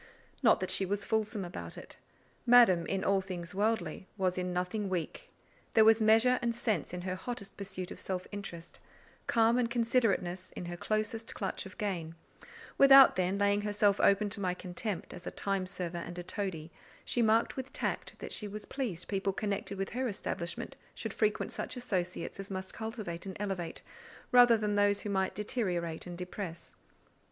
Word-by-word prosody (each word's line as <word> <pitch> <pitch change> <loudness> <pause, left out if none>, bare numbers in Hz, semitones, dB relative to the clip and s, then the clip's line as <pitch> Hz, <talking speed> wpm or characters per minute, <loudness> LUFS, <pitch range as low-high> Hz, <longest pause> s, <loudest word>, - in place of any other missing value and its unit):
Not - - +5
that - - 0
she - - +5
was 200 +1 -2
fulsome 215 -2 -1
about 85 - -7
it: - - -10 0.5
Madame, 230 -9 +7
in 195 -1 -1
all 195 0 +3
things 180 -3 -6
worldly, 195 -4 -1
was 185 -2 +1
in 180 0 -2
nothing 180 +3 -2
weak; 185 - -4 0.5
there 220 - +7
was 225 0 +6
measure 225 +4 +5
and 235 -1 0
sense 220 - -1
in 180 0 -5
her 185 0 -3
hottest 200 +1 -6
pursuit 190 -2 -6
of - - -8
self 185 -1 -3
interest, 195 -5 -8 0.5
calm 230 +1 +4
and 235 -2 +1
considerateness 225 -7 +1
in - - -6
her 175 0 -5
closest 215 +4 -2
clutch 195 -1 -3
of 190 - -14
gain; 175 -7 -3 0.6
without, 275 -1 +9
then, 185 +1 +1
laying 200 0 +2
herself 205 -1 +2
open 200 +1 +4
to 205 - -2
my 180 -2 0
contempt 185 +2 -5
as 180 - -9
a - - 0
time 195 -2 -2
server 180 -2 -3
and 175 +1 -7
a 175 - -4
toadie, 175 -5 -4 0.3
she 240 - +1
marked 225 +1 +3
with 265 0 -5
tact - - -2
that - - -7
she 210 - -2
was 210 +1 -7
pleased 225 -11 -4
people 195 -1 0
connected 200 0 -3
with 195 0 -2
her 255 +2 -1
establishment 200 +1 -4 0.2
should 225 -3 -5
frequent 215 -1 0
such - - -5
associates 190 -7 -3
as 195 - -6
must 190 -1 -5
cultivate 215 -6 -5
and 190 - -6
elevate, 195 -5 -3 0.5
rather 245 -2 +7
than 210 -1 -1
those 205 0 +3
who 205 - -4
might 190 -1 0
deteriorate 180 -7 -2
and 175 -1 -7
depress. 180 -1 -6
200 Hz, 180 wpm, -32 LUFS, 180-220 Hz, 0.6 s, without